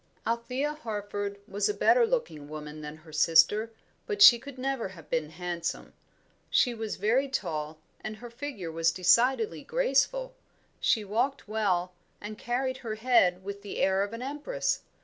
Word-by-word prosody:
Althea 250 +6 -1
Harford 205 -6 -4
was 200 - 0
a 415 - -1
better 475 -2 +4
looking 160 - -2
woman 155 0 -7
than 150 +1 -7
her 160 0 -16
sister, 165 +8 +4 0.4
but 420 -2 -3
she 240 -12 +10
could 275 +2 -10
never 265 -3 -2
have 185 -4 -14
been 160 -2 0
handsome. 170 0 -4 0.6
She 245 - +3
was 220 -2 -4
very 245 +6 +2
tall, 155 - -3 0.3
and 215 0 -5
her 240 +2 -10
figure 235 - -6
was 165 0 +2
decidedly 245 - +2
graceful; - - +1 0.5
she 220 - +2
walked 240 +8 -1
well, 185 -4 0 0.3
and 210 +1 -7
carried 255 +3 -2
her 230 -4 -5
head 215 -6 +3
with 200 +1 -6
the 200 - -7
air 190 0 +2
of 200 +1 -2
an 230 +2 -6
empress. 295 - -2
215 Hz, 160 wpm, -28 LUFS, 180-260 Hz, 0.6 s, she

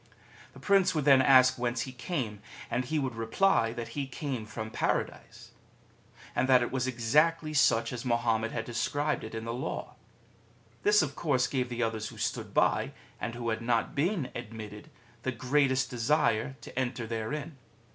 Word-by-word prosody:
The - - -13
Prince 195 -4 +3
would 150 -3 0
then 135 -2 +7
ask 130 -1 +6
whence 120 0 -1
he 130 - -4
came, 125 - -4 0.3
and 125 +2 0
he 155 +5 -1
would 135 -4 -1
reply 115 +3 +2
that 120 -1 -5
he 140 -2 -4
came 130 -4 -4
from 110 +1 -6
Paradise! 115 +1 -3 0.8
and 130 - +1
that 125 -2 +6
it - - -3
was 130 -1 -1
exactly 150 +7 +2
such 130 -4 +3
as 120 - -5
Mahommet 115 -2 +1
had 115 -1 -3
described 145 +6 -1
it 110 - -7
in 110 0 -5
the 115 - -3
Law. 125 - -4 0.9
This 210 -4 +5
of 140 -3 -4
course 135 -6 +1
gave 130 -2 -1
the 120 0 -2
others 110 -1 -2
who - - -11
stood - - -3
by, - - +2 0.3
and 115 +2 -4
who 120 -1 -3
had 110 0 -1
not 115 -1 0
been 160 -1 0
admitted, 105 -3 -8 0.3
the 130 - -1
greatest 130 +1 +1
desire 120 -1 +1
to - - -6
enter 125 -2 -2
therein. 135 +7 -4
125 Hz, 175 wpm, -30 LUFS, 115-140 Hz, 0.9 s, then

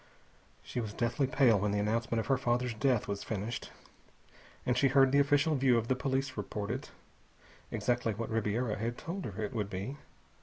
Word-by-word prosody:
She - - -4
was 110 -3 -4
deathly 120 +3 0
pale 125 -5 +4
when 105 +2 0
the 100 - 0
announcement 115 +3 0
of 110 - -2
her 135 - +2
father's 125 -1 0
death 125 0 +1
was 100 0 -3
finished, 110 +3 -4 1.0
and 125 - +2
she 135 - +4
had 135 - -1
heard 135 -1 +6
the 140 - +5
official 145 +2 +3
view 130 -3 +4
of 115 0 -1
the 130 - +3
police 135 +1 -1
reported 105 +6 -4 0.8
exactly 120 -3 0
what 115 +2 -4
Ribiera 110 0 0
had 115 +2 -2
told 180 +3 -5
her 110 0 -4
it 105 - -3
would 105 -4 -2
be. 105 +9 -4
120 Hz, 190 wpm, -32 LUFS, 105-135 Hz, 1.0 s, heard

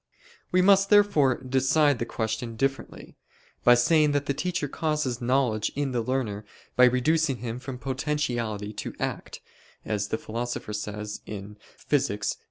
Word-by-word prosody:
We 185 0 +4
must 195 0 +5
therefore 200 -11 +4
decide 135 +2 +2
the 120 - -2
question 110 +1 -3
differently, 135 +3 -3 0.5
by 120 - +7
saying 150 +4 +3
that 145 0 0
the 140 - 0
teacher 180 0 -2
causes 150 -5 -2
knowledge 120 -4 +1
in 140 -1 -1
the 120 -2 0
learner, 115 -4 -2 0.3
by 125 - +7
reducing 135 +3 +2
him 120 +1 -5
from 130 -1 -7
potentiality 125 -6 -2
to 105 - -6
act, - - -4 0.4
as 105 -2 -1
the 110 - -1
Philosopher 115 -1 -5
says 105 0 -5
(Phys. 105 +3 -3
125 Hz, 140 wpm, -26 LUFS, 110-145 Hz, 0.5 s, by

